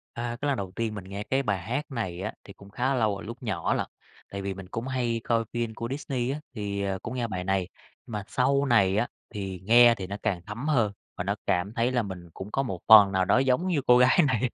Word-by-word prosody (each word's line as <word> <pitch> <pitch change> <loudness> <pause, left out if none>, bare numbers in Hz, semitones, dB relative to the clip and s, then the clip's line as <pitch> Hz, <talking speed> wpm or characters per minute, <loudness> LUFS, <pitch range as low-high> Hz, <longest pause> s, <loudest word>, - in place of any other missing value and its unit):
À, 120 0 -3
cái 145 - 0
lần 140 -3 +1
đầu 95 -2 -4
tiên 110 -2 -2
mình 100 - -6
nghe 100 +2 -6
cái 135 +4 0
bài 100 -5 0
hát 140 - -4
này 95 -8 -3
á, - - -3
thì - - -12
cũng 100 0 -15
khá 130 +6 0
lâu 110 -4 +1
rồi 100 - -8
lúc 120 +4 -8
nhỏ 95 -7 -1
lận, - - -1 0.4
tại 100 0 -5
vì 95 0 -3
mình 95 -1 -10
cũng 115 +6 -5
hay 120 -3 -1
coi 115 -1 +1
phim 120 -2 -2
của 115 +1 -5
Disney 130 -3 -2
á, 145 - -3
thì, 100 -3 -3
ờ, 95 -1 -2
cũng 125 - -5
nghe 120 -2 -1
bài 90 -4 -4
này. 95 -1 0 0.4
Mà 105 -4 -5
sau 140 +2 +2
này 100 -6 +3
á, 120 - +1 0.2
thì 95 -4 -5
nghe 120 +2 +7
thì 95 -1 -6
nó 100 +1 -5
càng 90 -3 0
thấm 120 +8 -5
hơn 115 -9 +2 0.2
và 90 - -3
nó 100 +2 -1
cảm 95 +5 0
thấy 120 +2 +1
là 120 -2 +2
mình 90 -4 -8
cũng 100 +2 -8
có 135 - 0
một 95 -9 -4
phần 105 -3 +9
nào 95 -1 +2
đó - - +4
giống 135 +7 +2
như 160 -6 +1
cô 125 0 +7
gái 125 +7 +5
này 130 -1 +1
115 Hz, 265 wpm, -27 LUFS, 100-125 Hz, 0.4 s, phần